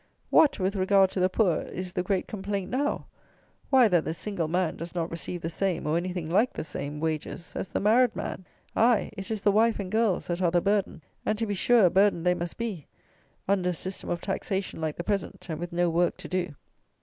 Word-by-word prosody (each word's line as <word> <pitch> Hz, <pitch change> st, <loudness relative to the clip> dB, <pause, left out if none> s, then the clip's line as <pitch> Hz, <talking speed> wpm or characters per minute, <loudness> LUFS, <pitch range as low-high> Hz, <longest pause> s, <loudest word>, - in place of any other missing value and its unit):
What, 305 Hz, -, +5 dB
with 190 Hz, +1 st, -1 dB
regard 190 Hz, 0 st, +4 dB
to -, -, -2 dB
the 185 Hz, 0 st, +3 dB
poor, 185 Hz, -4 st, +2 dB
is 185 Hz, 0 st, -6 dB
the 180 Hz, -, 0 dB
great 185 Hz, 0 st, 0 dB
complaint 200 Hz, -2 st, -4 dB
now? 285 Hz, +4 st, -1 dB, 0.6 s
Why, 260 Hz, -4 st, +6 dB
that 175 Hz, -5 st, +3 dB
the 160 Hz, -, -3 dB
single 180 Hz, -2 st, -3 dB
man 175 Hz, 0 st, 0 dB
does 170 Hz, +2 st, -7 dB
not 170 Hz, -1 st, -2 dB
receive 165 Hz, +2 st, -5 dB
the 165 Hz, -, -1 dB
same, 190 Hz, -1 st, -1 dB
or 150 Hz, +1 st, +1 dB
anything 175 Hz, -1 st, -2 dB
like 205 Hz, +10 st, +2 dB
the -, -, -4 dB
same, 150 Hz, -1 st, -5 dB
wages 160 Hz, +2 st, -4 dB
as -, -, -3 dB
the -, -, -2 dB
married 225 Hz, +4 st, +4 dB
man. 185 Hz, -, -5 dB, 0.3 s
Aye, 230 Hz, -1 st, +3 dB
it 195 Hz, -1 st, -6 dB
is 220 Hz, -2 st, -2 dB
the 205 Hz, -, +4 dB
wife 220 Hz, +2 st, +3 dB
and 190 Hz, -2 st, -4 dB
girls 220 Hz, -4 st, +1 dB
that 175 Hz, +1 st, -2 dB
are 175 Hz, -, +3 dB
the 175 Hz, +1 st, +3 dB
burden; 200 Hz, -4 st, 0 dB, 0.2 s
and 215 Hz, -, 0 dB
to 225 Hz, -, -1 dB
be 205 Hz, -, -2 dB
sure 225 Hz, +2 st, +4 dB
a 175 Hz, -, +4 dB
burden 195 Hz, -3 st, +3 dB
they 180 Hz, 0 st, +4 dB
must 175 Hz, -1 st, -5 dB
be, 215 Hz, -10 st, -4 dB, 0.6 s
under 190 Hz, -2 st, +2 dB
a -, -, 0 dB
system 190 Hz, +3 st, -6 dB
of 175 Hz, -, -2 dB
taxation 190 Hz, -2 st, -3 dB
like 155 Hz, -1 st, -2 dB
the 175 Hz, -, -3 dB
present, 200 Hz, 0 st, -2 dB
and 155 Hz, -, -4 dB
with 175 Hz, 0 st, -5 dB
no 175 Hz, +1 st, +1 dB
work 170 Hz, +1 st, +1 dB
to -, -, -8 dB
do. 180 Hz, -5 st, -2 dB
185 Hz, 230 wpm, -27 LUFS, 170-205 Hz, 0.6 s, Why